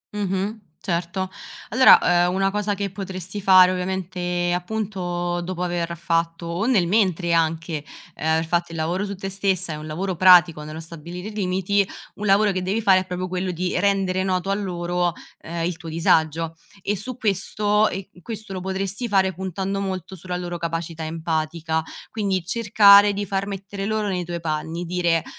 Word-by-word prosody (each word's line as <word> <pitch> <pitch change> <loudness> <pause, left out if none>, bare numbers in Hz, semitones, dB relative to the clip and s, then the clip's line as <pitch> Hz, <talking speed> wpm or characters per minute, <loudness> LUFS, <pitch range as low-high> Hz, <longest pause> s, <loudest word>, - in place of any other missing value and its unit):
Mh-mh, 200 +2 -2 0.2
certo. 175 +1 -2 0.4
Allora, 175 -7 +6
uhm, 180 - -2
una 195 0 +1
cosa 205 0 -1
che 200 -1 -3
potresti 190 0 -6
fare 185 -1 +7
ovviamente, 180 -1 -2
appunto, 180 -3 -2
dopo 180 0 -4
aver 170 -1 -2
fatto 165 0 -1
o 170 +5 -2
nel 215 -9 +3
mentre 185 -3 +1
anche, 160 -1 0 0.3
uhm, - - -8
aver 160 +1 +2
fatto 170 +1 -1
il - - -6
lavoro 175 +5 -1
su 200 - -5
te 195 +1 -5
stessa 190 -3 0
e - - -4
un 155 +1 -8
lavoro 185 +4 -3
pratico 175 -3 +6
nello 155 +1 -7
stabilire 170 +4 -8
i - - -10
limiti, 195 0 +1 0.3
un 210 - -4
lavoro 200 +1 +4
che 185 -1 -2
devi 195 +4 -1
fare 195 -4 +5
è 185 - -4
proprio 180 0 -3
quello 185 +1 -2
di 180 +1 -1
rendere 195 -2 +1
noto 190 0 -1
a - - +3
loro, 175 -3 -1 0.3
ehm, 165 0 -4
il 175 -1 -2
tuo 165 -1 -9
disagio. 160 0 +1 0.3
E 205 - 0
su 230 +5 -5
questo 210 0 +1
e 195 +1 -6
q 180 - -18
questo 220 0 -6
lo 185 - -4
potresti 195 +5 -3
fare, 190 -3 +2
puntando 190 +2 -3
molto 190 -1 -4
sulla 180 0 -5
loro 175 -1 -5
capacità 165 -1 -4
empatica, 160 0 -2 0.3
quindi 195 -5 -1
cercare 205 -1 +6
di 205 +1 -3
far 195 0 -2
mettere 195 0 -5
loro 215 -1 -1
nei 180 -2 -1
tuoi 170 0 -4
panni, 160 +2 -3
dire: 170 -2 +1
185 Hz, 180 wpm, -23 LUFS, 170-195 Hz, 0.4 s, fare